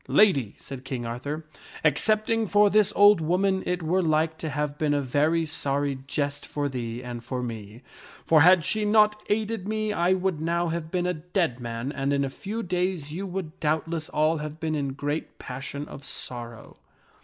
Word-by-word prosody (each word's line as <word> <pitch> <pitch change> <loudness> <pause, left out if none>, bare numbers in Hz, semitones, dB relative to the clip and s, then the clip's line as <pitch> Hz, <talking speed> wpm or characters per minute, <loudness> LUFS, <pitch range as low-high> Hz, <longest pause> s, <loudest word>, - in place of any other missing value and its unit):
" - - -30 0.2
Lady," 140 - +2
said 135 -2 -9
King 130 -3 -4
Arthur, 140 +7 -4 0.2
" - - -15
excepting 215 +7 +2
for 205 +1 +4
this 215 -1 +4
old 205 -3 +7
woman 190 +4 +1
it 180 -1 -1
were 180 +4 +2
like 160 -1 +1
to 160 - -3
have 150 +1 -3
been 150 -2 +2
a - - +2
very 150 +5 +1
sorry 140 -2 -1
jest 145 0 -2
for 145 -1 -2
thee 120 -2 -4
and 120 -1 -6
for 125 +1 -3
me; 110 0 -7 0.4
for 160 -2 +5
had 180 0 +6
she 215 +5 +1
not 210 0 +4
aided 215 -1 -1
me 215 0 -1
I 175 0 +3
would 185 -4 -1
now 170 +1 0
have 165 -1 -3
been 180 0 -1
a 180 - +1
dead 165 - -1
man 120 +2 -4
and 140 -1 -1
in 140 0 +1
a 135 - -4
few 215 +10 -5
days 180 -5 -2
you 195 +4 -4
would 180 -4 -5
doubtless 160 +1 -1
all 155 +2 +2
have 150 +1 -6
been 160 -1 -1
in 140 -3 -1
great 145 +3 -4
passion 140 +3 -6
of 140 - -10
sorrow." 120 -4 -6
155 Hz, 195 wpm, -26 LUFS, 140-185 Hz, 0.4 s, old